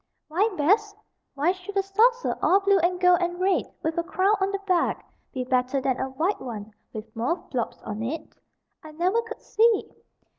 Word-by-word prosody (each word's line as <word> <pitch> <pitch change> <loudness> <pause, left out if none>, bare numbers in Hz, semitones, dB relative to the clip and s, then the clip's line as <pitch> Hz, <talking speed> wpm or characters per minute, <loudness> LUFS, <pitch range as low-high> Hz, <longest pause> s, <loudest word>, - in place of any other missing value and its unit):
Why 380 +8 +2
"best"? 410 +7 +2 0.4
Why 295 +5 +2
should 375 +2 -7
a 390 - +3
saucer, 460 +6 +2
all 385 - +5
blue 395 -1 +4
and 355 +1 +1
gold 360 -1 +5
and 350 0 -2
red, 375 +1 +1
with 320 +1 -1
a - - 0
crown 375 +4 +2
on 385 - +2
the 395 - -1
back, 360 -3 +1 0.3
be 255 - -3
better 255 +1 +1
than 260 -1 -1
a 265 - -2
white 325 +10 -1
one 220 -4 -7 0.2
with 220 0 -9
mauve 270 +10 -2
blobs 240 -4 -2
on 215 0 -5
it? 295 +8 -5 0.5
I 310 -1 -11
never 365 +8 +1
could 460 0 -9
see. 450 -1 +2
350 Hz, 190 wpm, -25 LUFS, 265-395 Hz, 0.5 s, all